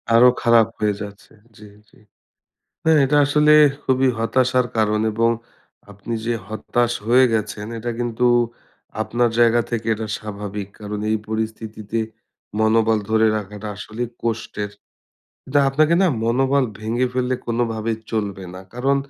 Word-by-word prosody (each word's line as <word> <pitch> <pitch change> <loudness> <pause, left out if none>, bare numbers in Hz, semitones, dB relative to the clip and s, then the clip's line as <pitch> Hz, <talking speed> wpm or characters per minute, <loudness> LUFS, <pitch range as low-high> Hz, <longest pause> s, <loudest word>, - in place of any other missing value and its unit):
আরও 125 +2 +8
খারাপ 115 -2 +5
হয়ে 105 -1 +1
যাচ্ছে। 100 0 -10 0.2
জি, 105 - -13 0.2
জি। - - -23 0.9
হ্যাঁ, 160 -1 +5
এইটা 145 +2 +2
আসলে 150 +1 +4 0.3
খুবই 130 0 +2
হতাশার 125 +2 +2
কারণ 105 -1 +2
এবং 115 +2 +2 0.6
আপনি 100 +3 -6
যে 120 - +1
হতাশ 120 +3 -1
হয়ে 125 +3 +6
গেছেন 105 -1 -2
এটা 120 +2 -3
কিন্তু 120 0 0 0.8
আপনার 120 +2 +1
জায়গা 120 0 +5
থেকে 115 -1 -3
এটা 110 +1 -5
স্বাভাবিক। 105 -1 -6
কারণ 105 0 -5
এই 110 - +2
পরিস্থিতিতে 110 0 -4 0.6
মনোবল 110 0 +3
ধরে 110 0 +4
রাখাটা 105 0 -6
আসলে 110 +4 -6 0.2
কষ্টের। 110 -3 -3 0.7
কিন্তু 145 +2 +1
আপনাকে 155 +4 +3
না - - +5 0.2
মনোবল 135 +4 +2 0.2
ভেঙে 115 +4 0
ফেললে 125 0 0
কোনোভাবেই 115 -1 -1
চলবে 100 -3 -3
না। 95 - -8
কারণ, 135 +3 +1
115 Hz, 135 wpm, -21 LUFS, 110-125 Hz, 0.9 s, আরও